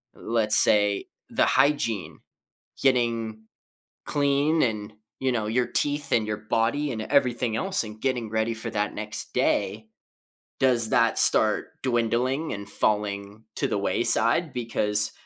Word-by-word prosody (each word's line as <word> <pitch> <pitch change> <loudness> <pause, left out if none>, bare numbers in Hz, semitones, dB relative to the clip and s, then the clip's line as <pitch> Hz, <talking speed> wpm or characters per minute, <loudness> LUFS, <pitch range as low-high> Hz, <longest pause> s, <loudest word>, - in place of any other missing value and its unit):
Let's 110 -2 +2
say 105 -1 +3 0.2
the - - +2
hygiene- 115 - +1 0.6
getting 115 -4 0 0.6
clean, 145 +2 +1
and, 105 -3 -2 0.3
you 130 -1 0
know, 110 -3 -1
your 120 +3 0
teeth 145 0 -1
and 110 -2 +2
your 105 0 -2
body 115 +7 -1
and 110 -2 -4
everything 125 -3 +1
else, 190 0 0
and 110 0 -10
getting 125 -4 -2
ready 110 +1 -1
for 110 - -6
that 105 0 -2
next 105 0 -5
day- 110 +1 0 0.7
does 120 -4 +3
that - - +2
start - - +4
dwindling 125 +4 0
and 100 0 -7
falling 105 0 -2
to - - 0
the - - -1
wayside 165 -4 +1
because 105 -3 0
115 Hz, 135 wpm, -25 LUFS, 105-130 Hz, 0.7 s, start